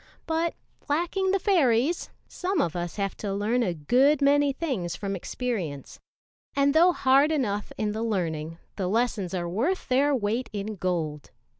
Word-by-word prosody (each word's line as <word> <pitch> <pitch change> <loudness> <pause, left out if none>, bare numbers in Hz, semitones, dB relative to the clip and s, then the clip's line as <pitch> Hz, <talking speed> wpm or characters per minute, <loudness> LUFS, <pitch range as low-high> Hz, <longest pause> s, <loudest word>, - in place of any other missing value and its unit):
But 325 +1 0 0.3
lacking 350 +5 0
the 390 - +3
fairies, 325 - +2 0.2
some 365 0 -2
of 170 - 0
us 175 -1 -3
have 195 -2 -2
to 205 - -4
learn 210 +5 0
a 180 -7 0
good 260 - +3
many 285 0 +4
things 255 - -3
from 195 +1 -3
experience; 185 - -4 0.6
and 280 0 +3
though 340 +3 +6
hard 275 0 +4
enough 210 -9 -1
in 210 -1 -1
the 215 +1 -4
learning, 165 -7 -2 0.2
the 190 -3 -1
lessons 210 -3 0
are 175 -1 -2
worth 250 - -1
their 275 +3 +3
weight 230 +2 -1
in 210 +1 -4
gold. 165 -5 -2
230 Hz, 160 wpm, -26 LUFS, 185-290 Hz, 0.6 s, though